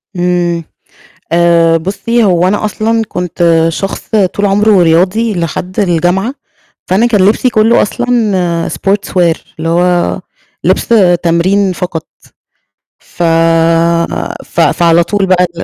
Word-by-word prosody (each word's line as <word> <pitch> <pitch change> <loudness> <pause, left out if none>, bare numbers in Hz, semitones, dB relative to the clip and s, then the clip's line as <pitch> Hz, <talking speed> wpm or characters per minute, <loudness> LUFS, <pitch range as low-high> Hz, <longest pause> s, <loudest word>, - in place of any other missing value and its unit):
امم، 175 -1 -1 0.7
آآ 170 -1 +3
بُصّي 205 +7 -1
هو 180 -2 +2
أنا 210 +2 -1
أصلًا 225 +2 -1
كنت 170 -2 0
شخص 195 +4 -5
طول 205 -1 0
عمره 200 -1 +3
رياضي 185 +7 +1
لحد 180 +2 -4
الجامعة، 185 - 0 0.5
فأنا 200 +6 +2
كان 220 -4 +1
لبسي 240 +4 +1
كلّه 220 +1 +3
أصلًا 205 -8 -1
sportswear، 185 -4 -1 0.2
اللي 165 - -3
هو 175 +1 0 0.4
لِبس - - 0 0.3
تمرين 185 +3 +1
فقط. 175 -3 -5 1.1
ف 175 - -2 1.2
ف - - -6
فعلى 170 0 +3
طول 200 +3 -1
بقى 185 -1 +2
ال 170 - -5
180 Hz, 115 wpm, -11 LUFS, 170-210 Hz, 1.2 s, آآ